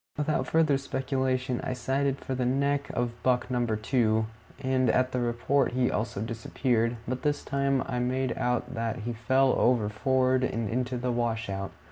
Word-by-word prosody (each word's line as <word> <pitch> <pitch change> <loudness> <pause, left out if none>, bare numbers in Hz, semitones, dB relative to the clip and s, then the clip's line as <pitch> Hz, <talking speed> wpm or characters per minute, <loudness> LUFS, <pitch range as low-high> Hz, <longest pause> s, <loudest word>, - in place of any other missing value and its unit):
Without 150 +1 0
further 155 -4 +3
speculation, 130 -2 -1
I 130 - -2
sighted 135 +2 0
for 135 - -5
the 130 0 -1
neck 140 +3 +1
of 120 -1 -2
buck 125 0 +1
number 120 -3 +1
two, 110 -1 +1 0.3
and 130 -2 +1
at 130 +3 +2
the 125 - -1
report 120 +3 +1
he 125 0 +2
also 105 -2 -2
disappeared; 115 +1 0
but 125 +1 -2
this 145 0 0
time 140 -1 +1
I 125 -2 -2
made 125 0 0
out 125 -1 -1
that 115 0 -2
he 120 +3 -3
fell 130 +3 +3
over 120 -4 +3
forward 130 +4 +2
into 125 +2 -1
the 125 +1 -1
washout. 115 -5 -2
125 Hz, 165 wpm, -28 LUFS, 115-130 Hz, 0.3 s, further